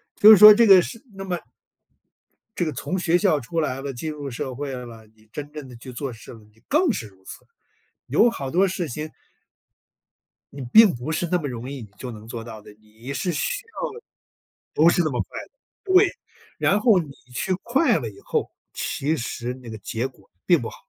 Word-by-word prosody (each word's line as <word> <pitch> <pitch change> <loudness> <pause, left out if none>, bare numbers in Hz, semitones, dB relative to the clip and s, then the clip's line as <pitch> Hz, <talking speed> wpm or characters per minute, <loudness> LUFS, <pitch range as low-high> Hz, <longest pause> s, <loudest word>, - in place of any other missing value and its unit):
就 210 - +7
是 215 - +10
说 210 +2 +11
这 230 +1 +4
个 190 -2 +9
是 230 +5 -7
那 195 0 -7
么 180 -3 -3 1.2
这 - - 0
个 155 - -2
从 180 +7 -4
学 175 -1 +2
校 180 -7 +2
出 165 +7 -4
来 135 -3 -2
了， 140 -1 -5
进 155 +6 -5
入 145 -3 -7
社 130 +1 -5
会 140 0 -5
了， 120 -3 -9
你 110 0 -26
真 145 0 -7
正 150 -3 -8
地 125 - -12
去 125 +2 -10
做 130 +1 -5
事 110 - -13
了， 115 - -13
你 105 +1 -23
更 315 +1 +3
是 115 - -5
如 95 -2 -22
此， - - -11 0.6
有 215 - +4
好 135 - -5
多 185 +6 +3
事 180 -3 -3
情 150 +4 -6 1.4
你 140 - -8
并 220 -4 +8
不 125 +6 -5
是 170 +2 -1
那 180 - +3
么 150 - -4
容 125 -1 -6
易 140 -3 -7
你 110 - -10
就 125 +1 -7
能 110 0 -11
做 115 -1 -6
到 110 -2 -10
的， 105 - -14
你 110 +5 -10
是 180 +5 -2
需 - - -2
要 - - -5 0.8
不 160 +3 +5
是 175 - +2
那 155 - 0
么 125 - -1
快 - - -7
的， - - -28 0.4
对。 385 +2 +6 0.5
然 200 - +2
后 215 -4 +4
你 150 -4 -6 0.2
去 185 - -1
快 250 0 +2
了 115 - -4
以 100 - -15
后， - - -2 0.2
其 150 +4 -2
实 120 0 -4
那 125 -3 -12
个 110 - -7
结 115 +4 -3
果 115 -7 -22 0.2
并 170 -7 +4
不 115 - -4
好。 - - -12
145 Hz, 235 characters per minute, -23 LUFS, 120-185 Hz, 1.4 s, 说